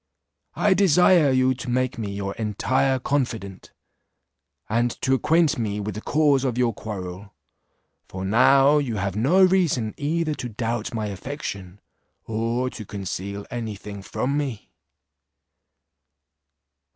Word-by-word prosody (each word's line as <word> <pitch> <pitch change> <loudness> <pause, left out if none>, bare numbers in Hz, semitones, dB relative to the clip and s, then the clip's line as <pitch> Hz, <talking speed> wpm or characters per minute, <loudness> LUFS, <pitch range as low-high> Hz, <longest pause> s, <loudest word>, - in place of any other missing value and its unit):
I 205 - +3
desire 180 -4 +5
you 130 0 +3
to 130 0 -7
make 130 0 0
me 105 -3 -3
your 100 0 -4
entire 130 +5 +1
confidant, 120 -8 -3 1.0
and 120 +3 +1
to 130 - +2
acquaint 155 +2 +2
me 105 -2 -2
with 105 0 -4
the 105 - -6
cause 145 -2 +2
of 125 -3 -1
your 120 -2 +2
quarrel; 100 -2 -7 0.7
for 95 0 -6
now 135 +7 +5
you 125 -6 -2
have 100 -1 -2
no 155 - +4
reason 170 - +2
either 155 +2 -1
to 125 -4 -5
doubt 115 +1 -3
my 110 -2 -3
affection, 100 -3 -6 0.5
or 115 +3 -1
to 110 - -8
conceal 100 0 -5
any 115 -4 -4
thing 100 0 -9
from 130 +7 -2
me." 130 -8 -5
120 Hz, 130 wpm, -24 LUFS, 105-140 Hz, 1.0 s, desire